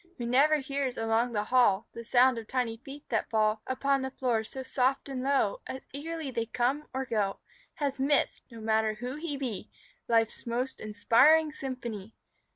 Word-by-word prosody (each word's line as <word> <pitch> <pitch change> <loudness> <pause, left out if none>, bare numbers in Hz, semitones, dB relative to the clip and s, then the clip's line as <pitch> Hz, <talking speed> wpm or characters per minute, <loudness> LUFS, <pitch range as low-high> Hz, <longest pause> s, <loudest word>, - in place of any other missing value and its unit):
Who 240 - -4
never 275 +6 +4
hears 275 -2 -2
along 225 +2 +1
the 210 -1 0
hall 225 -3 +3
The 235 - -7
sound 245 +1 +4
of 220 - -10
tiny 240 -2 -1
feet 275 +4 -11
that 225 - -1
fall 215 -1 +2
Upon 275 +1 +1
the 265 - -2
floor 245 -4 0
so 260 +4 -7
soft 260 +1 0
and 265 -2 -4
low 280 - +1
As 260 - -5
eagerly 310 0 -5
they 230 -2 -2
come 255 +6 -1
or 265 0 -2
go, 210 -5 -1 0.4
Has 280 -3 -2
missed, 280 +1 +2
no 230 -2 -11
matter 220 0 +1
who 245 +3 -5
he 305 -2 -4
be, 240 -6 -4 0.4
Life's 225 0 +1
most 250 +3 -2
inspiring 255 +9 +4
symphony. 235 -7 -6
255 Hz, 175 wpm, -29 LUFS, 225-275 Hz, 0.4 s, never